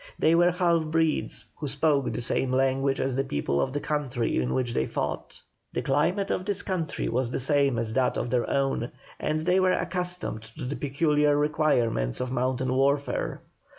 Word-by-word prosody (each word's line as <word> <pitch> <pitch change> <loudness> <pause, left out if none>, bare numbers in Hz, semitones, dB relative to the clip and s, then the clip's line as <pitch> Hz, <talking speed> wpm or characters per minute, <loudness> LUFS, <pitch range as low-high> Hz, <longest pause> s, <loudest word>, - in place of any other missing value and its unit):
They 160 - +3
were 175 +1 +5
half 170 -3 +1
breeds, 160 0 0
who 150 - -4
spoke 140 0 +1
the 120 - -3
same 125 +2 0
language 135 +1 +1
as 130 -1 0
the 135 - +1
people 70 - -1
of 130 - -1
the 145 - -2
country 140 - -1
in 65 0 -2
which 125 -2 -1
they 65 - 0
fought. - - -4 0.3
The - - -2
climate 175 +9 +1
of 185 - -1
this 200 0 -2
country 180 -5 -2
was 120 +1 0
the 125 - -2
same 140 -1 +2
as 115 -1 -1
that 130 0 +1
of 120 - -2
their 125 -2 +1
own, 135 -3 0 0.3
and 155 0 -1
they 180 +3 +2
were 185 -1 +3
accustomed 180 -9 -2 0.2
to - - -5
the 135 +3 -3
peculiar 145 +1 +2
requirements 145 - +1
of 125 0 -3
mountain 130 0 0
warfare. 140 +2 0
140 Hz, 185 wpm, -27 LUFS, 130-160 Hz, 0.3 s, were